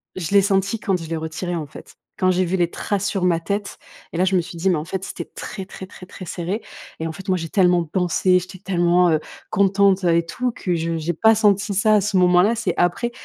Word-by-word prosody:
je 180 Hz, -2 st, -4 dB
l'ai 200 Hz, -, +7 dB
senti 195 Hz, +2 st, 0 dB
quand 195 Hz, -2 st, 0 dB
je 160 Hz, -, -8 dB
l'ai 165 Hz, -, -2 dB
retirée 160 Hz, +3 st, -4 dB
en 155 Hz, -3 st, -4 dB
fait. -, -, -13 dB, 0.2 s
Quand 185 Hz, -1 st, +3 dB
j'ai 185 Hz, 0 st, +1 dB
vu 180 Hz, +2 st, -1 dB
les 175 Hz, -2 st, +1 dB
traces 200 Hz, -1 st, -2 dB
sur 195 Hz, -2 st, -2 dB
ma 170 Hz, -2 st, +2 dB
tête 200 Hz, +4 st, -4 dB, 0.3 s
et -, -, -5 dB
là, 185 Hz, -, +3 dB
je 190 Hz, 0 st, +1 dB
me 180 Hz, -, +3 dB
suis 170 Hz, 0 st, -9 dB
dit: 185 Hz, +3 st, +1 dB
«mais -, -, +2 dB
en 150 Hz, -, -4 dB
fait 190 Hz, +2 st, -4 dB
c'était -, -, -6 dB
très, 195 Hz, -3 st, -6 dB
très, 190 Hz, 0 st, -9 dB
très, 185 Hz, -1 st, -13 dB
très 185 Hz, -, -10 dB
serré» 180 Hz, +6 st, -4 dB, 0.4 s
et 160 Hz, -, -3 dB
en -, -, -4 dB
fait 190 Hz, +4 st, -11 dB
moi 185 Hz, -, +2 dB
j'ai 165 Hz, -1 st, -5 dB
tellement 180 Hz, -2 st, +3 dB
pensé, 180 Hz, +2 st, +2 dB
j'étais 185 Hz, +1 st, -10 dB
tellement, 175 Hz, -1 st, +2 dB
heu, 155 Hz, -, +2 dB, 0.3 s
contente, 195 Hz, 0 st, +3 dB
heu 170 Hz, -2 st, +3 dB
et 170 Hz, 0 st, +2 dB
tout 245 Hz, +9 st, -2 dB
que 185 Hz, -5 st, -3 dB
je 165 Hz, 0 st, -2 dB
j'ai 160 Hz, +2 st, -2 dB
pas 220 Hz, +7 st, +4 dB
senti 210 Hz, -1 st, +2 dB
ça, 215 Hz, +2 st, +4 dB
à 210 Hz, -, +4 dB
ce 200 Hz, 0 st, 0 dB
moment-là, 180 Hz, +4 st, +4 dB
c'est 230 Hz, +1 st, -1 dB
après, 175 Hz, +7 st, +1 dB
185 Hz, 260 wpm, -21 LUFS, 170-200 Hz, 0.4 s, l'ai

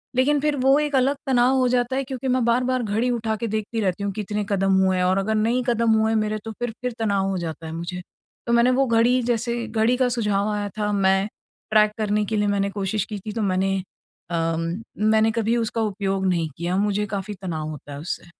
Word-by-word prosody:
लेकिन 285 Hz, +3 st, +3 dB
फिर 295 Hz, 0 st, +1 dB
वो 270 Hz, +2 st, +4 dB
एक 295 Hz, -1 st, -1 dB
अलग 270 Hz, +2 st, +3 dB
तनाव 255 Hz, 0 st, +3 dB
हो 255 Hz, -1 st, +3 dB
जाता 245 Hz, +1 st, +1 dB
है 270 Hz, -, 0 dB
क्योंकि 265 Hz, 0 st, -5 dB
मैं 255 Hz, -1 st, +2 dB
बार-बार 250 Hz, +1 st, +1 dB
घड़ी 220 Hz, +4 st, 0 dB
उठा 225 Hz, -2 st, -1 dB
के 230 Hz, +2 st, -3 dB
देखती 220 Hz, +1 st, -3 dB
रहती 190 Hz, 0 st, -1 dB
हूँ, 200 Hz, -, -1 dB
कितने 210 Hz, 0 st, -3 dB
कदम 195 Hz, -1 st, +2 dB
हुए 190 Hz, 0 st, +2 dB
हैं 180 Hz, -, +1 dB
और 185 Hz, +1 st, +2 dB
अगर 210 Hz, +3 st, 0 dB
नहीं 230 Hz, +4 st, +1 dB
कदम 235 Hz, -1 st, +2 dB
हुए 220 Hz, +1 st, +2 dB
मेरे, 215 Hz, 0 st, 0 dB
तो 225 Hz, -, -4 dB
फिर 240 Hz, +2 st, -4 dB
फिर 250 Hz, -1 st, -2 dB
तनाव 200 Hz, -3 st, +1 dB
हो 190 Hz, -, -1 dB
जाता 165 Hz, -2 st, -5 dB
है 160 Hz, -, -6 dB
मुझे। 170 Hz, +2 st, -5 dB, 0.5 s
तो 235 Hz, -, +1 dB
मैंने 235 Hz, +2 st, +5 dB
वो 270 Hz, +2 st, +3 dB
घड़ी 235 Hz, +2 st, +3 dB
जैसे 235 Hz, 0 st, -1 dB
घड़ी 225 Hz, +2 st, +1 dB
का 255 Hz, -1 st, +2 dB
सुझाव 210 Hz, -3 st, 0 dB
आया 205 Hz, -1 st, -2 dB
था, 210 Hz, -1 st, 0 dB
मैं 195 Hz, 0 st, +2 dB, 0.4 s
ट्रैक 215 Hz, -1 st, +5 dB
करने 210 Hz, -1 st, +1 dB
के 220 Hz, -, -2 dB
लिए 205 Hz, -, +1 dB
मैंने 200 Hz, -1 st, +1 dB
कोशिश 200 Hz, 0 st, -2 dB
की 210 Hz, -2 st, -6 dB
थी, 210 Hz, +3 st, -6 dB
तो 225 Hz, -, -2 dB
मैंने 195 Hz, -1 st, +1 dB, 0.5 s
अम, 165 Hz, -1 st, 0 dB, 0.5 s
मैंने 220 Hz, 0 st, +4 dB
कभी 230 Hz, +1 st, 0 dB
उसका 230 Hz, 0 st, -1 dB
उपयोग 195 Hz, -2 st, -1 dB
नहीं 170 Hz, -3 st, 0 dB
किया, 175 Hz, +2 st, -2 dB
मुझे 210 Hz, 0 st, +1 dB
काफ़ी 200 Hz, +1 st, -4 dB
तनाव 160 Hz, -5 st, -3 dB
होता 150 Hz, -1 st, -9 dB
है 140 Hz, -, -7 dB
उससे। 165 Hz, -, -5 dB
215 Hz, 230 wpm, -23 LUFS, 195-240 Hz, 0.5 s, मैंने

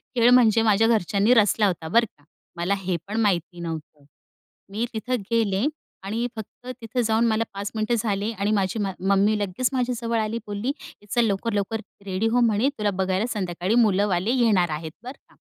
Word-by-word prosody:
खेळ 235 Hz, 0 st, +5 dB
म्हणजे 230 Hz, -3 st, +5 dB
माझ्या 220 Hz, 0 st, +3 dB
घरच्यांनी 210 Hz, +1 st, +3 dB
रचला 210 Hz, -2 st, +4 dB
होता 170 Hz, -3 st, -3 dB
बरं 230 Hz, +7 st, +4 dB
का. 145 Hz, -, -27 dB, 0.3 s
मला 175 Hz, +4 st, 0 dB
हेपण 190 Hz, +4 st, -3 dB
माहिती 175 Hz, -3 st, 0 dB
नव्हतं. 160 Hz, -3 st, -7 dB, 0.7 s
मी 225 Hz, +4 st, -1 dB
तिथं 245 Hz, +4 st, -2 dB, 0.2 s
गेले 220 Hz, 0 st, +1 dB, 0.4 s
आणि 225 Hz, +5 st, -2 dB
फक्त 220 Hz, +3 st, -10 dB
तिथं 225 Hz, +2 st, -2 dB
जाऊन 225 Hz, +1 st, +2 dB
मला 220 Hz, 0 st, +1 dB
5 200 Hz, +1 st, -5 dB
मिनिटं 220 Hz, +2 st, 0 dB
झाले 210 Hz, 0 st, -1 dB
आणि 205 Hz, -1 st, -1 dB
माझी 200 Hz, +1 st, 0 dB
मा 195 Hz, -2 st, -1 dB, 0.2 s
मम्मी 200 Hz, +2 st, +3 dB
लगेच 205 Hz, +5 st, -1 dB
माझ्याजवळ 240 Hz, -2 st, -1 dB
आली. 215 Hz, +1 st, -1 dB
बोलली, 205 Hz, +5 st, -3 dB, 0.3 s
"ये -, -, -19 dB
चल 240 Hz, +1 st, +2 dB
लवकर-लवकर 210 Hz, +1 st, -1 dB, 0.2 s
रेडी 195 Hz, +3 st, -1 dB
हो," 245 Hz, +2 st, +2 dB
म्हणे, 230 Hz, +3 st, +3 dB
"तुला 210 Hz, -1 st, 0 dB
बघायला 190 Hz, +4 st, 0 dB
संध्याकाळी 185 Hz, +1 st, -1 dB
मुलंवाले 205 Hz, -2 st, +2 dB
येणार 185 Hz, -7 st, +3 dB
आहेत," 160 Hz, -1 st, -7 dB
बरं 255 Hz, +3 st, -8 dB
का. -, -, -23 dB
210 Hz, 175 wpm, -24 LUFS, 195-230 Hz, 0.7 s, खेळ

